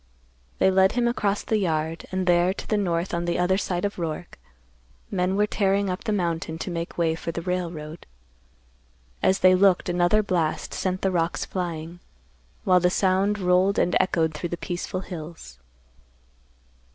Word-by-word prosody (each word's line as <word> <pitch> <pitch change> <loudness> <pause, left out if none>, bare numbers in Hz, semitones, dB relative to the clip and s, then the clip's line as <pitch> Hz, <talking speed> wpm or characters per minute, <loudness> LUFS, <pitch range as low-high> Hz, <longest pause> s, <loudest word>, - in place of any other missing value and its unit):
They 190 - +4
led 190 +1 +4
him 240 -1 +1
across 210 -4 0
the 220 - 0
yard, 160 -3 -2
and 185 0 -1
there 175 +1 +3
to - - -8
the 215 - +1
north 180 -3 -1
on 170 0 -1
the 175 - 0
other 185 +2 +2
side 180 -1 -2
of 200 - -3
Roark, 170 +1 -5 0.7
men 180 0 0
were 205 +1 +3
tearing 200 -2 +1
up 180 - -5
the 215 - 0
mountain 170 -4 -1
to 180 - -5
make 170 0 -5
way 165 -2 +2
for 165 +1 -4
the 165 0 -5
railroad. 170 -3 -4 1.1
As 190 - +2
they 185 0 +7
looked, 185 -1 +3
another 175 +4 +3
blast 170 -6 -1
sent 185 0 -2
the 190 - +2
rocks 170 -1 0
flying, 170 -2 -5 0.6
while 185 -3 +5
the 180 0 +3
sound 190 +2 +2
rolled 185 +1 +2
and 175 - +2
echoed 165 -4 +1
through 170 +3 -4
the 175 - -3
peaceful 180 +2 -4
hills. 160 - -9
180 Hz, 170 wpm, -25 LUFS, 170-190 Hz, 1.1 s, they